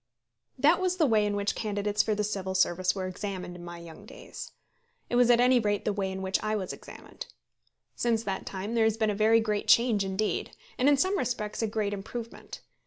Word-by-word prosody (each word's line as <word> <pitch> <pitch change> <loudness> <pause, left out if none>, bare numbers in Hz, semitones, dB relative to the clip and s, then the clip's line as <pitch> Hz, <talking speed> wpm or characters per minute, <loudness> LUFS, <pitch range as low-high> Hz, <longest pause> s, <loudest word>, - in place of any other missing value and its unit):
That 310 +7 +4
was 365 0 0
the 325 - +4
way 215 -5 +3
in 205 - -1
which 205 +1 0
candidates 210 -1 0
for 215 - 0
the 210 - -1
Civil 195 -2 -3
Service 185 0 +2
were 190 -1 -3
examined 185 -1 -5
in 175 - -10
my 175 0 -8
young 170 -2 -12
days. - - -10 0.6
It - - +1
was 245 0 +5
at 240 -1 +6
any 250 0 +5
rate 205 -2 -1
the 210 - +1
way 195 -1 -2
in 190 0 -5
which 190 0 0
I 215 0 -1
was 190 -3 -3
examined. - - -11 0.7
Since 230 -2 0
that 195 -3 -4
time 195 +3 -4
there 230 -1 +3
has 220 0 +1
been 220 -2 +1
a - - -1
very 220 +2 +4
great 215 -2 -1
change 230 -4 +4
indeed; 195 +2 -2 0.2
and 260 +3 +4
in 285 - +4
some 375 +8 +1
respects 235 -4 -2
a 225 - +1
great 210 -1 -1
improvement. 225 +4 -7
210 Hz, 220 wpm, -28 LUFS, 195-230 Hz, 0.7 s, at